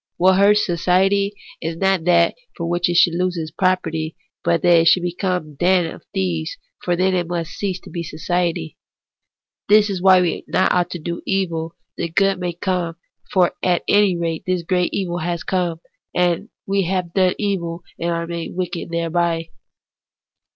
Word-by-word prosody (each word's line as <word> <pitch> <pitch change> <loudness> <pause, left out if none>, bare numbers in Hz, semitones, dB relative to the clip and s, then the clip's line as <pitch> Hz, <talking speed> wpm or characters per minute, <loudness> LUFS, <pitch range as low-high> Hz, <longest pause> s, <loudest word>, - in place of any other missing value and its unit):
What 185 +2 +4
hurts 210 +1 +5
society 195 +3 +2 0.3
is 165 0 -3
not 190 -2 +1
that 170 -1 +4 0.2
it 175 +1 0
should 175 -1 +5
lose 180 +1 -1
its 160 -1 -4
property, 160 -4 0 0.3
but 170 -1 +1
that 175 -1 +6
it 165 - +3
should 180 +2 +5
become 180 0 -1
a 150 - -14
den 175 +1 +2
of - - -14
thieves; 85 -4 -2 0.3
for 175 - +1
then 185 +2 +2
it 175 -2 0
must 170 -1 -3
cease 190 -3 -3
to - - -12
be 170 - -4
society. 170 - -2 0.9
This 210 0 +5
is 185 -2 -3
why 185 -1 +6
we 175 - 0 0.2
ought 185 - +3
not 180 -1 +2
to 180 - -5
do 170 +1 -5
evil 170 -4 -1 0.2
that 170 0 -3
good 195 -1 +3
may 180 -1 -2
come; 175 -1 -2 0.4
for 180 -2 +3
at 180 -2 +1
any 200 -3 +4
rate 165 -2 -2
this 180 -2 0
great 180 +1 0
evil 175 -3 -2
has 170 +1 -2
come, 175 -3 -1 0.4
that 175 -1 +1 0.2
we 195 0 +1
have 180 -1 -2
done 185 -2 +3
evil 175 -5 -2 0.2
and 170 - -1
are 170 0 -1
made 170 0 -5
wicked 180 -2 -3
thereby. 170 0 -1
175 Hz, 175 wpm, -20 LUFS, 170-185 Hz, 0.9 s, that